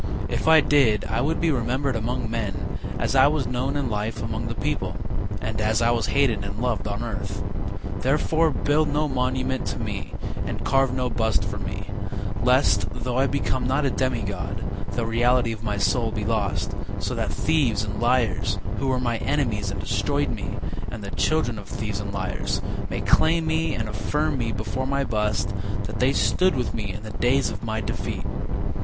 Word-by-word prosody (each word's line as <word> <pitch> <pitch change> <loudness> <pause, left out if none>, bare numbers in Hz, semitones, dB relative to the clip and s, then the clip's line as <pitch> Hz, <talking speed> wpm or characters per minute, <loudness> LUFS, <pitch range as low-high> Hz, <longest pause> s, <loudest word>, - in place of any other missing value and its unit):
If - - -1
I 160 -1 +8
did 130 -9 +4
I 110 +3 0
would 155 +5 +1
be 165 -1 +3
remembered 130 +1 0
among 115 +1 -1
men 110 -5 -3 0.2
As - - 0
I - - +7
was - - +1
known 130 +3 -1
in 145 - 0
life 110 +2 -2
among 110 +1 -2
the 115 - -3
people, 100 - -1 0.4
And 110 0 -2
as 110 0 +2
I 115 0 +4
was 120 -1 +1
hated 135 -7 +2
and 100 +1 -5
loved 115 -5 0
on 105 +3 -3
earth, 105 -7 -3 0.6
Therefore, 155 +4 +3
build 150 +1 +2
no 150 +1 +1
monument 130 -1 0
to - - -2
me, - - -4 0.3
And - - -4
carve 135 -1 +3
no 125 0 0
bust 110 -2 +1
for - - -3
me, - - -4 0.6
Lest, 105 -6 +4
though 125 +1 -2
I 135 - +4
become 130 -2 0
not 135 +3 +2
a 135 - +2
demi 130 -4 0
god, 100 -4 -3 0.3
The 120 - 0
reality 120 +1 +3
of 110 -2 -5
my 105 -2 -1
soul 115 +2 +2
be 105 -1 -2
lost, 105 -4 0 0.2
So - - -2
that - - -1
thieves 125 -10 +2
and 105 +1 -4
liars, 115 -6 +2 0.2
Who 135 - 0
were 130 -1 +2
my 120 -2 0
enemies 110 -7 0
and - - -4
destroyed - - 0
me, - - -4 0.3
And 110 -3 -6
the 100 - -5
children 120 -8 +1
of 100 0 -11
thieves 105 -2 -3
and 100 -1 -4
liars, 95 -1 -2 0.3
May - - -2
claim 165 0 +4
me 160 +1 +1
and 110 -1 -2
affirm 140 +9 0
before 115 +2 -2
my 140 0 +1
bust 105 -4 0 0.3
That 105 +3 -5
they 130 +2 +4
stood 185 +5 +3
with 125 -2 -1
me 105 -3 -3
in 105 +2 -7
the 110 - -6
days 130 +6 +2
of - - -6
my 110 -1 -1
defeat. 100 - -3
120 Hz, 190 wpm, -25 LUFS, 105-135 Hz, 0.6 s, I